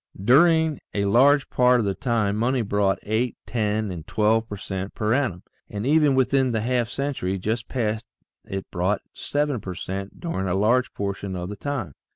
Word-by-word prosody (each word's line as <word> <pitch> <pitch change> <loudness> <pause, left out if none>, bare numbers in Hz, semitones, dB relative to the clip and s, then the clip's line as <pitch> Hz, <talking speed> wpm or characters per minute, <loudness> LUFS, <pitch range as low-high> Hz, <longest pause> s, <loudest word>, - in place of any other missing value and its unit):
During 160 - +4 0.2
a 100 -1 +1
large 135 +7 +4
part 125 0 +4
of 110 - 0
the 100 - 0
time 110 -4 0
money 120 +3 +1
brought 100 -1 +1
eight, 110 +3 -1
ten, 110 -2 -1
and 85 -3 -7
twelve 110 +1 +1
per 105 - -5
cent 95 0 -5
per 110 +1 0
annum, 120 -10 0 0.3
and 105 +2 -4
even 150 -1 +4
within 130 -1 +2
the 110 - 0
half 120 0 0
century 130 -9 -2
just 110 +5 -2
past 110 -2 -2 0.4
it 95 0 -5
brought 95 +3 0
seven 145 -5 -1
per 95 -1 -6
cent 95 +3 -6
during 130 - -3
a 90 - 0
large 120 +5 +2
portion 100 -1 -3
of 90 0 -4
the 105 - -5
time. 135 - -4
110 Hz, 185 wpm, -24 LUFS, 100-130 Hz, 0.4 s, During